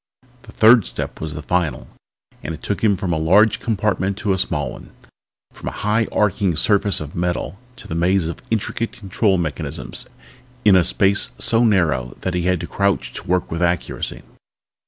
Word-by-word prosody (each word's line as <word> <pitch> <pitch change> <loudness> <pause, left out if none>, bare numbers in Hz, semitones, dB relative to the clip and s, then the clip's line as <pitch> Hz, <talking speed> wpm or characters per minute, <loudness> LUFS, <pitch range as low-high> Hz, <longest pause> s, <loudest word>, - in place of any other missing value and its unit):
The 110 - -14
third 110 0 +6
step - - -5
was 80 -1 -4
the 75 - -6
final 90 -3 0
one - - -16 0.6
and 80 - -4
it - - -16
took 100 - -3
him 100 -3 +3
from 90 -2 -2
a 80 - 0
large 100 +7 +4
compartment 100 -3 -1
to 105 -3 0
a - - -1
small 75 -8 -1
one, - - -11 0.6
from - - -10
a - - -8
high 110 +2 +2
arching 100 -4 +1
surface 100 +3 +2
of 75 -1 -7
metal 90 +3 -2 0.2
to 120 - -12
a - - -1
maze 85 +1 +1
of 85 - -6
intricate 115 +1 -2
control 100 -1 0
mechanisms 75 -6 -4 0.6
in 100 -3 +7
a 90 - +5
space 100 +3 +2
so 115 +1 +3
narrow 85 - +1
that 95 - -2
he 90 -1 -1
had 90 -1 +2
to - - -4
crouch 100 -1 -1
to 90 - -8
work 90 0 0
with 85 +1 -3
accuracy. 85 0 -1
95 Hz, 190 wpm, -20 LUFS, 85-105 Hz, 0.6 s, in